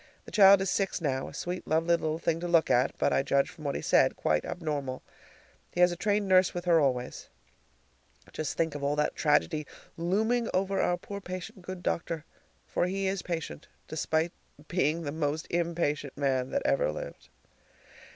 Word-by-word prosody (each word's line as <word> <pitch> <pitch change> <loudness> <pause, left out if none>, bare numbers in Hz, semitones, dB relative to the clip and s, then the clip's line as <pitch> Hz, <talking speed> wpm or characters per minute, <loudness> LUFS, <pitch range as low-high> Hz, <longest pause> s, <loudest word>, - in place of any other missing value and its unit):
The - - -11
child 195 -2 +7
is 190 -1 0
six 195 -1 0
now, 135 -5 -1
a - - -10
sweet, 180 +1 -4
lovely 160 +2 +1
little 155 -1 -2
thing 165 0 0
to 175 - -3
look 170 -2 +3
at, 125 +3 +3
but, - - +2
I - - +3
judge 140 0 +1
from 155 - -12
what 140 - -1
he - - -4
said, - - +4
quite 75 -1 0
abnormal. 145 -6 -4 0.7
He - - -5
has 180 0 +6
a - - -3
trained 205 +2 0
nurse 185 -1 +4
with 175 0 -4
her 170 -2 +5
always. 125 -4 -1 1.0
Just 155 - -3
think 165 -2 +1
of 145 -1 -6
all 140 +1 +1
that 150 - 0
tragedy 150 0 +1 0.3
looming 220 +8 +1
over 195 +1 +1
our 175 - +1
poor 200 +3 -7
patient 185 +3 -7
good 180 0 -7
doctor, 165 -1 -2 0.4
for 175 - 0
he 195 +1 -2
is 190 -1 -1
patient, 165 -3 -5 0.2
despite 160 +1 0 0.4
being 165 -1 0
the 145 - -3
most 155 0 -2
impatient 165 -5 -1
man 135 -2 0
that 280 - -1
ever - - +2
lived! - - -8
170 Hz, 185 wpm, -29 LUFS, 150-185 Hz, 1.0 s, child